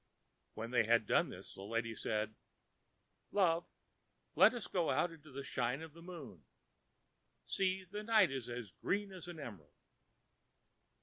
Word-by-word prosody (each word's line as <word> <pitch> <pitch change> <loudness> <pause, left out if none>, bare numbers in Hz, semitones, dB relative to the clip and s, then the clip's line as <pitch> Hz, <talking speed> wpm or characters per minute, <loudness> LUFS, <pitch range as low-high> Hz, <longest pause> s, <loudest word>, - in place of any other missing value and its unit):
When 115 +2 -4
they 120 -3 +4
had 115 -1 +5
done - - +3
this - - -9
the - - -9
lady 115 +3 -1
said, 110 0 -1 1.0
ãLove, 175 -4 +3 0.7
let - - +7
us 235 - -3
go 175 -4 +1
out 175 - +2
into 155 -2 -13
the 140 +1 -5
shine 130 +2 -1
of 160 -2 -9
the 170 - -13
moon. 165 - -9 1.0
See, 190 0 +1
the 205 +4 -5
night 215 -7 +5
is 130 -3 -4
as 120 -5 -5
green 200 - -1
as 185 -2 -8
an 175 -2 -7
emerald.... 100 - -9
150 Hz, 150 wpm, -37 LUFS, 115-180 Hz, 1.0 s, let